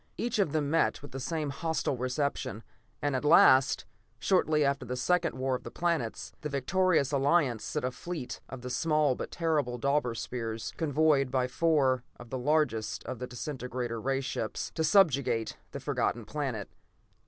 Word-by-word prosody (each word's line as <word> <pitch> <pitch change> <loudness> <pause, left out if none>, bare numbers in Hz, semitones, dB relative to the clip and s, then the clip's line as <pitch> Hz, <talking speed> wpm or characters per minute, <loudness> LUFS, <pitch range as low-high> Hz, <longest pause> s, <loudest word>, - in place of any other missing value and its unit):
Each 235 -1 -1
of 190 -8 +2
them 150 -2 0
met 165 -3 +2
with 145 - -9
the 135 - -5
same 150 +1 -2
hostile 155 -1 -1
reception, 130 -2 -2 0.4
and 145 -2 +1
at 130 - -1
last, 140 -4 +6 0.3
shortly 155 -5 +2
after 140 0 0
the 125 +1 -4
second 170 +6 +1
War 130 0 0
of 125 - -2
the - - -8
Planets, 170 -10 -2
the 150 - -3
victorious 150 +1 +2
Alliance 140 -4 +2
sent 150 -4 -2
a 130 - -1
fleet 155 -1 -6
of 130 - -7
the 125 0 -5
small 150 0 +2
but - - -5
terrible 150 -7 0
Deuber 140 -3 +1
Spheres, 115 -3 -4
convoyed 150 -3 +2
by 130 0 +1
four 135 -3 +2 0.2
of 120 -1 -12
the 130 - -2
largest 130 -6 0
of 130 - -6
the 125 - -4
disintegrator 125 -3 -4
ray 135 +2 0
ships, 135 - -3
to 160 - -1
subjugate 140 - +3
the - - -6
Forgotten 120 -2 -1
Planet. 130 -8 -3
140 Hz, 170 wpm, -30 LUFS, 125-155 Hz, 0.4 s, last